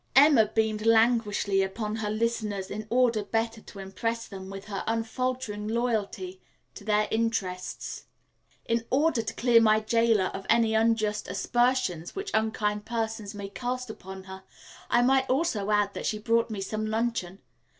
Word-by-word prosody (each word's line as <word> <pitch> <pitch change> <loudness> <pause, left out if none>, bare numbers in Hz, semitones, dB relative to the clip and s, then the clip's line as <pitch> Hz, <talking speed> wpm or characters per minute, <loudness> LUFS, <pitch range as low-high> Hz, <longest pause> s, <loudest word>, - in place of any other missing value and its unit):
'" - - -39
Emma 255 -8 +5
beamed 215 0 0
languishingly 225 -3 +3
upon 210 +3 -3
her 215 -2 -2
listeners 215 -3 -2
in 215 +1 -5
order 235 -3 +2
better 225 +1 -2
to - - -13
impress 230 +4 -3
them 190 -1 -9
with 195 0 -8
her 200 -2 -4
unfaltering 225 -1 -2
loyalty 215 -5 -2 0.3
to - - -11
their 210 0 +2
interests. 200 -5 -2 0.6
"In 230 0 0
order 285 -2 +2
to - - -5
clear 235 -1 +5
my 215 -1 +5
jailer 225 -3 +2
of 195 - -7
any 225 -1 +4
unjust 220 -1 +1
aspersions 240 -9 0
which 395 +1 -4
unkind 210 -1 0
persons 220 -3 -3
may 200 -1 -6
cast 250 +2 -4
upon 190 -2 -10
her, 190 0 -10 0.5
I 240 - +4
might 265 +1 +3
also 255 - 0
add 205 -1 +2
that - - -4
she 215 - -1
brought 230 +2 +1
me 210 -3 -4
some 215 +2 -3
luncheon. 220 -4 -2
220 Hz, 160 wpm, -27 LUFS, 205-230 Hz, 0.6 s, Emma